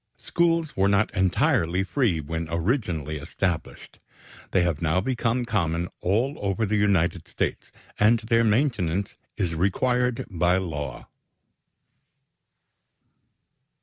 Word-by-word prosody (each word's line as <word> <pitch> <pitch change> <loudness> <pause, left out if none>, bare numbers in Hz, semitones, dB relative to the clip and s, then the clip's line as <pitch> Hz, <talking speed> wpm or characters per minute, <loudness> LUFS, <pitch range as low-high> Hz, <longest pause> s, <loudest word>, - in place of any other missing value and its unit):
Schools 165 -2 0
were 95 +1 +3
not 100 +2 +2
entirely 95 - +2
free 100 - 0
when 80 +2 -4
originally 85 - -1
established. 85 +4 -4 0.5
They 90 - +2
have 85 -4 -1
now 85 +2 +2
become 120 +2 -1
common 85 -6 -1
all 120 +10 0
over 100 +2 -1
the 105 +1 0
United 95 -5 +1
States, - - -3 0.3
and 110 +3 +5
their 115 +1 +2
maintenance 105 - 0 0.2
is 85 -3 -1
required 125 +8 0
by 90 -2 +1
law. 75 -8 -4
95 Hz, 110 wpm, -25 LUFS, 85-115 Hz, 0.5 s, and